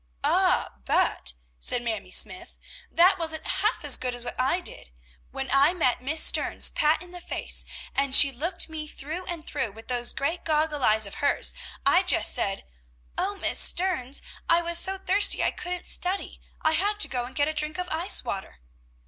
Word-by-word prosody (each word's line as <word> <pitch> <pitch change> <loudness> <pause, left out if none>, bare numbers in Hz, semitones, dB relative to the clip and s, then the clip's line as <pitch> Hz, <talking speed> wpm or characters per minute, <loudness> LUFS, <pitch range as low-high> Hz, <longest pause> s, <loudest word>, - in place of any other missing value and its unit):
"Ah, - - +1
but!" - - +1 0.3
said 240 - +1
Mamie 220 -5 -4
Smythe, 355 - +1 0.4
"that 360 +3 +3
wasn't 320 -1 -4
half 410 +5 -1
as - - +3
good 250 -1 -4
as 245 0 -7
what 240 - -4
I 265 +8 +1
did. 350 - -4 0.4
When - - -6
I 275 +5 +4
met 255 -9 0
Miss 310 +5 +4
Stearns - - +2
pat 305 +3 +1
in 355 - -14
the 355 0 -10
face, - - -2 0.3
and 275 -1 +2
she 280 - +8
looked 335 +8 -3
me 315 -1 -7
through 315 +5 -6
and 335 -3 -6
through 260 -8 -4
with 225 +3 -14
those 240 -1 0
great 320 +6 -3
goggle 305 -2 -1
eyes 215 -1 +4
of 200 - -8
hers, 285 - +1 0.3
I 365 - +5
just 370 - +3
said, 195 0 -2 0.5
'O 400 +2 -2
Miss - - +2
Stearns, 315 -8 +2 0.3
I 335 +1 +4
was 340 0 +3
so 385 +2 0
thirsty 395 +2 +2
I - - +1
couldn't 360 0 -6
study; 370 +2 -4 0.2
I 315 - +3
had 410 +6 -1
to - - +6
go 245 -2 -3
and 255 +1 -12
get 290 0 +1
a 310 - -2
drink 305 0 +1
of 360 0 -4
ice 340 +4 +1
water!' 195 - -6
310 Hz, 190 wpm, -25 LUFS, 255-355 Hz, 0.5 s, she